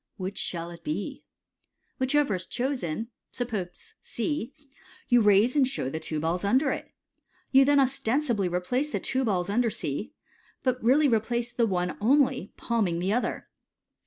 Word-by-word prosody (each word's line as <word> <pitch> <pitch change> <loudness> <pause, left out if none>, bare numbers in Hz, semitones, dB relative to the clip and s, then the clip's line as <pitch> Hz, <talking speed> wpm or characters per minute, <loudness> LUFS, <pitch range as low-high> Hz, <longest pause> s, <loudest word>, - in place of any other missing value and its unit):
Which 190 +1 -4
shall 170 -1 -2
it 170 - -12
be? 305 - -4 0.4
" - - -48
Whichever 265 -2 +2
is 185 -1 -3
chosen, 235 - -2 0.2
suppose 230 - -5
C, 290 -6 -3 0.6
you 245 -2 +6
raise 210 +4 +4
and 275 -3 +4
show 135 - -3
the 160 - -3
two 155 -1 -3
balls 165 +4 -1
under 260 +8 +3
it. - - -5 0.6
You 270 0 +7
then 285 0 +4
ostensibly 250 -5 +1
replace 245 +12 -1
the - - -1
two 265 0 -1
balls 185 -6 0
under 230 +4 +2
C, 205 - -4 0.5
but 255 -2 0
really 280 +6 +5
replace 235 0 0
the 235 -1 +1
one 180 -2 -1
only, 260 -2 +2
palm 230 -4 0
ing 170 -1 -1
the 185 +4 0
other. 245 - -2
235 Hz, 160 wpm, -27 LUFS, 185-265 Hz, 0.6 s, You